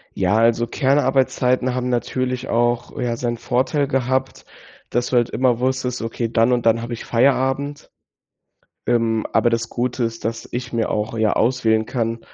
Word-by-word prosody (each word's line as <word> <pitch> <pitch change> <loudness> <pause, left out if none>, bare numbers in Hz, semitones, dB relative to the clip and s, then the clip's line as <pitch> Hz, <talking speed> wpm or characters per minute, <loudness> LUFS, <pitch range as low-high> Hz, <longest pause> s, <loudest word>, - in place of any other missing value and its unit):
Ja, 95 +1 +1
also, 115 +1 +3
Kernarbeitszeiten 130 -2 +1
haben 125 0 -2
natürlich 125 +1 -2
auch, 120 0 0
ja, 120 -1 -1
seinen 120 -1 -2
Vorteil 135 +4 0
gehabt, 130 -1 -1 0.4
dass 120 +1 0
du 125 - +1
halt 120 - +2
immer 125 -2 +1
wusstest: 130 -1 -1
„Okay, 115 +1 -2
dann 115 +1 +3
und 120 -1 -1
dann 115 0 +3
habe 120 0 -5
ich 115 - -7
Feierabend.” 135 +4 0 1.0
Ähm, 115 -2 +1
aber 110 +1 +3
das 115 -1 -1
Gute 125 0 -1
ist, 115 -1 -5
dass 115 0 -4
ich 120 0 -5
mir 115 -1 -1
auch 105 +2 -2
ja 110 -1 +2
auswählen 110 -2 +2
kann, 115 -2 -2
120 Hz, 165 wpm, -21 LUFS, 115-130 Hz, 1.0 s, also